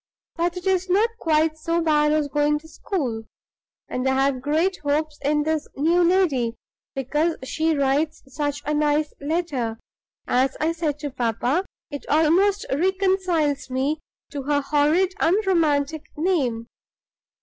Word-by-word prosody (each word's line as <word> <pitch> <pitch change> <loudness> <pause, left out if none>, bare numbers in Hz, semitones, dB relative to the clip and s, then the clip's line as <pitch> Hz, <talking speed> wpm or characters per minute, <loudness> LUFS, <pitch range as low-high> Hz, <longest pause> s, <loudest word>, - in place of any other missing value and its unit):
But 345 +1 -1
it 360 - -7
is 375 -1 +1
not 420 +5 +3
quite 315 -1 +1
so 335 +2 0
bad 300 -2 +3
as 305 -1 +1
going 295 +1 +1
to 310 +2 -12
school; 255 - -3 0.6
and 255 +1 -2
I 265 - +2
have 270 -2 0
great 320 +7 +1
hopes 300 +1 -1
of 295 +1 +1
this 315 -1 -1
new 335 +5 +3
lady, 315 -10 +2 0.4
because 295 +5 0
she 315 +4 0
writes 280 +3 0
such 290 +2 -3
a 300 - 0
nice 300 0 +1
letter! 285 -7 -2 0.5
As 260 +1 +1
I 315 +2 +1
said 320 -3 -2
to 290 -2 -4
papa, 250 - 0 0.3
it 285 - -7
almost 360 +7 +3
reconciles 365 -4 +1
me 270 +4 -1 0.3
to 285 - -4
her 285 +1 +1
horrid, 300 +6 +2
unromantic 320 -5 +1
name." 280 -10 0
300 Hz, 140 wpm, -23 LUFS, 285-340 Hz, 0.6 s, not